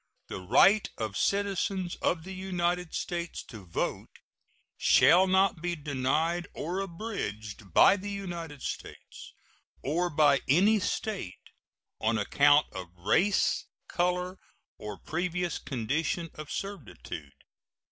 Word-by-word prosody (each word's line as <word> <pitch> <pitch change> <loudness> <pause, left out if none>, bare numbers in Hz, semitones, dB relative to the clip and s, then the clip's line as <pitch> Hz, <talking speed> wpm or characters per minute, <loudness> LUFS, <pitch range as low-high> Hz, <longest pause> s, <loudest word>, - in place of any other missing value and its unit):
The - - -5
right 165 - +5
of 110 -3 -3
citizens 195 -2 0
of 165 -2 0
the 190 +2 -7
United 180 -2 -2
States 170 -1 -3
to 110 -5 -11
vote 85 - -2 0.7
shall 185 +2 +5
not 190 -2 +3
be 175 0 -1
denied 150 +4 0
or 175 +5 -3
abridged 140 - -5
by 200 - +6
the 205 +2 -6
United 170 -8 -6
States, - - -8 0.5
or 170 +6 0
by 145 -3 +4
any 200 +10 +5
State, 200 - -4 0.5
on 115 +1 +1
account 145 +8 +4
of 90 -1 -6
race, 160 - +2 0.2
color, 180 +1 -1 0.4
or 105 -1 -6
previous 175 +1 -2
condition 150 +7 -2
of 155 -1 -9
servitude. 105 - -6
170 Hz, 115 wpm, -29 LUFS, 135-185 Hz, 0.7 s, by